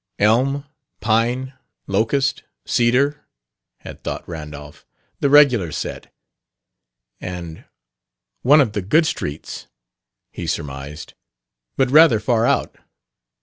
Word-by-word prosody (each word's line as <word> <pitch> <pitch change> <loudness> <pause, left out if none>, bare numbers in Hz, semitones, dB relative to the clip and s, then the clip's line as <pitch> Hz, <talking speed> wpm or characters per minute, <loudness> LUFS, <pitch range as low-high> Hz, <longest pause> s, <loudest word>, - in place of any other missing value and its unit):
"Elm, 130 +7 +2 0.3
Pine, 120 +4 0 0.3
Locust, 115 +8 0 0.2
Cedar," 130 +5 +1 0.6
had - - -11
thought - - -5
Randolph; 75 -3 -9 0.4
"the 140 - +1
regular 130 - +5
set." - - -6 1.1
And, 85 -3 -7 0.8
"One 145 +4 +6
of 120 -6 +1
the 105 - -2
good 155 - +3
streets," 75 - -5 0.6
he - - -6
surmised, 70 +2 -5 0.6
"but 130 -1 +2
rather 150 -6 +6
far 115 +1 +1
out. - - 0
115 Hz, 100 wpm, -20 LUFS, 90-140 Hz, 1.1 s, One